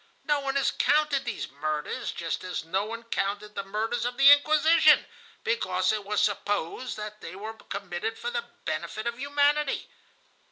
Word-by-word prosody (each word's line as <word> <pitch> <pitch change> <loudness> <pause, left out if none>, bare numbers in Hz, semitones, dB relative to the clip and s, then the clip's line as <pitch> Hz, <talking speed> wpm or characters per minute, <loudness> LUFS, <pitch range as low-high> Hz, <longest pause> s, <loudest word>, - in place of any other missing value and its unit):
No 295 -2 +1
one 275 -1 -3
has 275 - +2
counted 295 -2 +2
these - - -4
murders, 150 +1 -3
just 165 -1 -4
as 180 -3 -4
no 190 +5 0
one 230 +2 -6
counted 210 -2 -2
the - - -3
murders 215 +5 -2
of 245 +1 -2
the 275 +1 +9
Inquisition, 305 +3 +6 0.4
because 185 -5 +1
it 215 -1 -2
was 210 +1 0
supposed 205 +3 -1
that 210 0 -7
they 165 - -8
were 215 +3 -6
committed 200 0 -5
for 480 - -4
the 475 -1 -2 0.2
benefit 215 - -3
of 235 0 -3
humanity. 285 +1 +1
220 Hz, 165 wpm, -27 LUFS, 195-275 Hz, 0.4 s, the